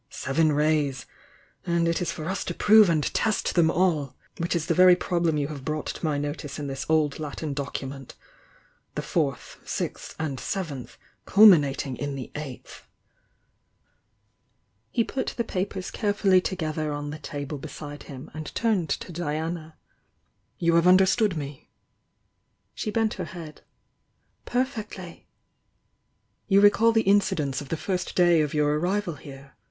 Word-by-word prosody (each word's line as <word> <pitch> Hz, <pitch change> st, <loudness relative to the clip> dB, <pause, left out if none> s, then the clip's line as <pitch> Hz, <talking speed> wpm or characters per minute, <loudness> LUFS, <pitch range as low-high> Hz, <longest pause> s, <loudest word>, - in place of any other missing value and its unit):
Seven 155 Hz, +4 st, +1 dB
Rays! 150 Hz, -3 st, +1 dB, 0.3 s
— -, -, -33 dB
and 170 Hz, -1 st, +2 dB
it 170 Hz, +1 st, 0 dB
is 175 Hz, -, -1 dB
for 155 Hz, -, -6 dB
us 190 Hz, +3 st, -2 dB
to 175 Hz, -, -4 dB
prove 215 Hz, -2 st, +6 dB
and 155 Hz, -3 st, +2 dB
test 215 Hz, -2 st, 0 dB
them 170 Hz, -2 st, +4 dB
all! 160 Hz, -7 st, +1 dB
— -, -, -31 dB
which 170 Hz, +1 st, -1 dB
is 165 Hz, -2 st, -1 dB
the -, -, +1 dB
very 180 Hz, 0 st, +7 dB
problem 170 Hz, -3 st, 0 dB
you 145 Hz, 0 st, -1 dB
have 145 Hz, -3 st, -7 dB
brought 155 Hz, +1 st, -3 dB
to -, -, -6 dB
my 155 Hz, -3 st, +1 dB
notice 145 Hz, 0 st, -4 dB
in 145 Hz, -, -4 dB
this 135 Hz, -1 st, -5 dB
old 155 Hz, -2 st, +2 dB
Latin 150 Hz, 0 st, -4 dB
document: 135 Hz, -1 st, -6 dB, 0.8 s
'the -, -, -1 dB
Fourth, -, -, -2 dB
Sixth -, -, -4 dB
and 145 Hz, -5 st, -3 dB
Seventh, 155 Hz, -, -5 dB, 0.3 s
culminating 150 Hz, -, +5 dB
in 145 Hz, -1 st, -3 dB
the 130 Hz, -2 st, -7 dB
Eighth.' 150 Hz, -4 st, -8 dB, 1.0 s
" -, -, -45 dB, 0.7 s
He 230 Hz, -, +1 dB
put 260 Hz, +3 st, -3 dB
the 235 Hz, -, +1 dB
papers 190 Hz, -2 st, -3 dB
carefully 205 Hz, -3 st, +2 dB
together 155 Hz, -5 st, -2 dB
on 145 Hz, 0 st, -4 dB
the 155 Hz, -, -7 dB
table 145 Hz, 0 st, -5 dB
beside 145 Hz, +1 st, -8 dB
him, 135 Hz, 0 st, -9 dB
and 155 Hz, 0 st, -6 dB
turned 210 Hz, -8 st, +1 dB
to -, -, -8 dB
Diana. 160 Hz, 0 st, -4 dB, 0.8 s
"You 170 Hz, -1 st, +2 dB
have 170 Hz, +1 st, +4 dB
understood 190 Hz, +1 st, +4 dB
me?" 140 Hz, -2 st, -7 dB, 1.0 s
She -, -, -4 dB
bent 220 Hz, 0 st, +1 dB
her 185 Hz, -, -5 dB
head. 165 Hz, -2 st, -9 dB, 0.8 s
"Perfectly!" 215 Hz, -8 st, -4 dB, 1.2 s
"You 195 Hz, -1 st, +5 dB
recall 205 Hz, +3 st, +5 dB
the 225 Hz, -1 st, +3 dB
incidents 155 Hz, -9 st, +2 dB
of 140 Hz, -, -10 dB
the 165 Hz, -, -1 dB
first 185 Hz, +2 st, -3 dB
day 175 Hz, -3 st, +5 dB
of 150 Hz, 0 st, -2 dB
your 150 Hz, 0 st, +2 dB
arrival 185 Hz, +1 st, -1 dB
here? 140 Hz, -1 st, -12 dB
160 Hz, 155 wpm, -26 LUFS, 145-185 Hz, 1.2 s, very